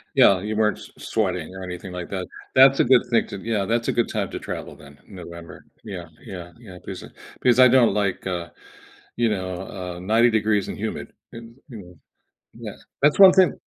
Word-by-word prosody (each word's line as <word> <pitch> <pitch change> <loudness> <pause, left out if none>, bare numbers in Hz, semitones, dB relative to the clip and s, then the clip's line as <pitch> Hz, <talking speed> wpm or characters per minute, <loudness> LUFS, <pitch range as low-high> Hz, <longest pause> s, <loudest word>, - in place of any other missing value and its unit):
Yeah, 95 -2 +5
you 105 +1 -4
weren't 105 -1 +1
s - - -13
sweating 90 -4 -2
or 95 - -8
anything 90 0 -7
like 90 -1 -7
that. 95 -2 -4 0.3
That's 135 +1 +6
a - - +6
good 125 -1 +5
thing 115 - +2
to 100 - -7
Yeah, 105 -1 -2
that's 115 +3 -1
a - - +2
good 120 - 0
time 105 -4 -2
to - - -5
travel - - -7
then- 70 -1 -16
November. 85 -3 -11 0.2
Yeah, 95 -6 -7 0.2
yeah, 90 -2 -9
yeah 95 -7 -12
because - - -9
I - - -10 0.3
because 125 0 +3
I 130 - +9
don't 125 -2 +4
like, 100 -3 -1
uh, 85 -2 -4 0.7
you 120 -1 +2
know, 95 -2 -4 0.3
uh, - - -9
90 110 +6 +3
degrees 110 -2 0
and - - -6
humid. - - -5 0.2
It's, 115 0 -9 0.2
you 120 - -9
know 90 -3 -13 0.6
yeah, - - -8 0.3
that's 145 +6 +3
one 190 -2 +9
thing 185 -6 +3
100 Hz, 205 wpm, -23 LUFS, 90-115 Hz, 0.7 s, I